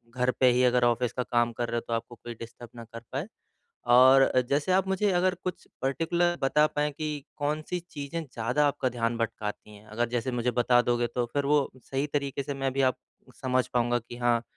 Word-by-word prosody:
घर 125 0 +2
पे 130 -1 +6
ही 125 +1 +2
अगर 125 0 +3
ऑफ़िस 120 0 +1
का 125 - -1
काम 120 -1 +1
कर 120 0 -3
रहे 120 - -1
हो - - -1
तो 115 - -2
आपको 115 +1 -4
कोई 120 +1 -8
डिस्टर्ब 115 +1 -10
ना 115 - -8
कर 115 - -7
पाए 140 +9 -3 0.7
और 130 +1 +7 0.2
जैसे 145 +6 +1
आप 190 +1 +3
मुझे 190 +2 +1
अगर 185 +1 +2
कुछ 185 - -5 0.2
पर्टिकुलर 170 +6 +1
बता 150 +3 +4
पाएँ 150 0 -1
कि 150 -1 -4
कौन 150 +1 -1
सी 180 - -1
चीजें 145 +3 -5
ज़्यादा 125 +1 0
आपका 140 -2 0
ध्यान 115 -1 -1
भटकाती 105 -2 -4
हैं? 105 +1 -15
अगर 115 +2 -2
जैसे 120 +2 -2
मुझे 125 0 0
बता 120 0 +3
दोगे 120 0 +1
तो 120 +1 -2
फिर 145 -1 0
वो 145 -1 +2
सही 135 +2 -2
तरीके 140 -1 -2
से 140 - -4
मैं 135 -1 -2
भी 135 - -1
आप - - -10 0.5
समझ 130 -1 +1
पाऊँगा 120 0 +1
कि 120 +1 -11
हाँ 120 -1 +1
125 Hz, 220 wpm, -28 LUFS, 120-145 Hz, 0.7 s, और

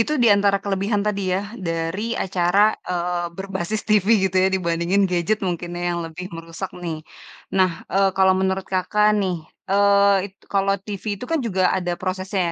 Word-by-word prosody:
itu 230 - +1
diantara 200 -3 +4
kelebihan 200 +1 0
tadi 200 -1 0
ya 195 - 0 0.2
dari 165 +8 -2
acara, 190 +3 +3 0.2
eee, 175 -1 -1
berbasis 195 +1 -3
TV 210 -2 +3 0.2
gitu 190 0 0
ya 190 - +4
dibandingin 180 +1 +1
gadget 180 +4 +1
mungkin 175 -1 -3
ya 175 0 -1
yang 170 - -2
lebih 175 +3 -7
merusak 165 +3 -7
nih, 165 -2 -3 0.6
nah, 185 -1 +3 0.2
eee, 195 0 +3
kalau 190 0 +5
menurut 190 0 0
Kakak 210 +3 +2
nih, 185 -2 0 0.3
eee, 200 0 +4 0.2
it - - -42
kalau 195 0 +1
TV 200 -1 -7 0.2
itu - - -5
kan 330 - +1
juga 190 -5 0
ada 180 -1 -2
prosesnya 185 +1 -2
190 Hz, 170 wpm, -22 LUFS, 175-200 Hz, 0.6 s, kalau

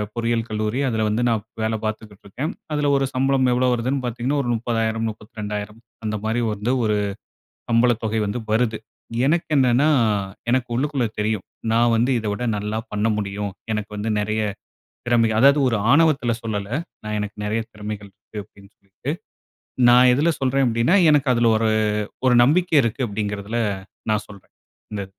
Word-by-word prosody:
பொறியியல் 115 -1 0
கல்லூரி. 110 +3 -1
அதுல 110 -1 0
வந்து 110 +3 0
நா 115 - +3 0.3
வேலை 110 0 0
பார்த்துக்கிட்டுருக்கேன். 110 - -5 0.2
அதுல 145 -1 +1
ஒரு 135 - +1
சம்பளம் 130 -1 +2
எவ்வளோ 125 +1 +2
வருதுன்னு 130 +3 -1
பார்த்தீங்கன்னா, 125 +4 -1
ஒரு 120 - -3
30,000, 115 -1 -1
32,000 105 -1 -7 0.3
அந்த 110 0 -1
மாரி 115 +2 0
வந்து 105 +5 -1
ஒரு 105 -1 +1 0.7
சம்பளத் 115 0 +3
தொகை 110 0 0
வந்து 105 +4 -2
வருது. 110 0 +1 0.5
எனக்கு 165 +3 +1
என்னன்னா, 130 +3 +4 0.6
எனக்கு 130 -1 +1
உள்ளுக்குள்ள 135 0 0
தெரியும். 105 -2 -1 0.3
நா 115 - +4 0.2
வந்து 120 +4 +2
இத 110 - -8
விட 115 +4 -4
நல்லா 105 +2 -2
பண்ண 105 +2 +1
முடியும். 100 -1 -3 0.2
எனக்கு 105 -1 -3
வந்து 110 +2 -2
நெறைய 110 +1 -1 0.7
திறமை 120 -1 +3
அதாவது 140 +4 +6
ஒரு 115 - +1
ஆணவத்தில 145 -5 +4
சொல்லல. 105 -3 -3 0.4
"நா - - -5
எனக்கு 105 0 -4
நெறைய 110 +2 0
திறமைகள் 105 -1 -7
இருக்கு." 105 - -12
அப்படீன்னு 100 +1 -19
சொல்லிட்டு. 100 +7 -8 0.8
நா 120 - +7 0.2
எதுல 150 +6 +2
சொல்றேன் 135 0 +2
அப்படீன்னா, 115 - +2 0.2
"எனக்கு 145 -3 +3
அதுல 120 -1 +3
ஒரு 110 0 +1 0.6
ஒரு 125 - +5
நம்பிக்கை 165 +4 +3
இருக்கு" 120 +2 -1
அப்படீங்கிறதில 105 +2 -3 0.5
நா 105 - +3
சொல்றேன். 100 -2 -15 0.4
இந்த 100 -1 -3
115 Hz, 155 wpm, -22 LUFS, 105-125 Hz, 0.8 s, நா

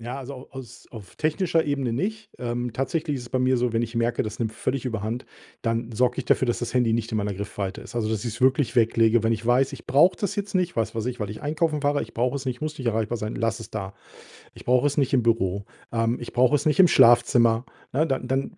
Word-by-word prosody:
Ja, 120 +3 -5
also 135 0 -7
au 125 - -11
aus 130 -3 -10
auf 105 -6 -11
technischer 165 +1 +1
Ebene 140 -5 -1
nicht. 215 - -3
Ähm, 120 0 -3
tatsächlich 145 +5 -2
ist 125 - -6
es 120 - -10
bei 130 - 0
mir 130 0 +3
so, 120 -1 0
wenn 115 0 +1
ich 115 0 -5
merke, 115 +1 +1
das 110 - -6
nimmt 110 -2 -2
völlig 130 +3 -2
Überhand, 115 +1 -3 0.3
dann 115 0 -2
sorge 125 +2 +1
ich - - -2
dafür, 130 - +2
dass 120 - -1
das 120 -1 -3
Handy 125 -3 +2
nicht 115 0 -1
in 110 - -1
meiner 100 -1 -2
Griffweite 100 -1 -5
ist. 120 - -10
Also, 110 -2 0
dass 110 0 -2
ich's 115 +1 -5
wirklich 130 -2 +2
weglege. 115 -1 +3
Wenn 115 - +3
ich 115 0 -3
weiß, 125 +3 +3
ich - - -11
brauche 150 +8 +5
das 200 -1 -3
jetzt 200 -1 -4
nicht, 180 -2 0
was 110 -1 -1
weiß 115 +1 -3
ich, 125 0 -3
weil 105 -1 -3
ich 110 - -8
einkaufen 155 0 0
fahre 145 0 +1
ich - - -7
brauche 125 +4 0
es 135 - -6
nicht, 130 -2 -1
ich 125 - -21
muss 155 0 -4
nicht 130 - -5
erreichbar 115 +1 0
sein 110 +1 -4
lasse 115 0 -1
es 115 - -9
da. 100 -3 -4 0.6
Ich - - -13
brauche 125 +3 +3
es 145 - -2
nicht 135 -2 +1
im 125 - +4
Büro. 100 -4 0 0.3
Ähm, 115 +1 0
ich 120 - -8
brauche 130 +4 +4
es 145 - -1
nicht 150 +1 +2
im 185 - +9
Schlafzimmer. 120 -1 +5 0.3
Ne, 155 +4 +2
dann 130 -3 -2
dann 135 +1 -2
120 Hz, 265 wpm, -25 LUFS, 115-135 Hz, 0.6 s, im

